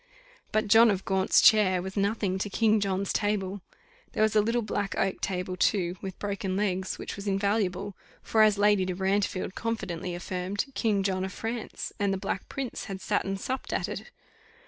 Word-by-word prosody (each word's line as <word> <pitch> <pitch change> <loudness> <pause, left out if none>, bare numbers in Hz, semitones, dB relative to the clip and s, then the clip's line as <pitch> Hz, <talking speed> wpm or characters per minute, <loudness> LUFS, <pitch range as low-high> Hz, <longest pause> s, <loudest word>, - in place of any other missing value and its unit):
But 215 0 +1
John 225 +2 +7
of 195 -2 -1
Gaunt's 190 -1 +3
chair 205 -4 +6
was 190 +2 -6
nothing 200 -2 0
to 205 - -2
King 220 +1 +3
John's 195 -1 -1
table. 205 -2 -1 0.5
There 215 - +2
was 220 0 +2
a 210 - +6
little 230 +2 0
black 205 -2 -2
oak 195 0 0
table, 185 -1 -2
too, 180 -1 +1
with 190 -2 -6
broken 200 -2 -3
legs, 190 -2 -1
which - - -6
was 200 +1 -7
invaluable 200 -1 0 0.3
for, 220 - +2
as 215 -1 +5
Lady 205 -1 +4
de 185 -1 -2
Brantefield 190 0 0
confidently 185 -6 -3
affirmed, 185 +2 -3
King 210 -6 +1
John 190 -1 0
of 190 - -3
France, 225 +2 -5
and 200 -1 +1
the 195 - 0
Black 190 - -4
Prince, 270 -3 -4
had 195 -2 -6
sat - - 0
and 195 0 -2
supped 260 +5 -4
at - - -1
it. - - -6
200 Hz, 190 wpm, -28 LUFS, 190-210 Hz, 0.5 s, John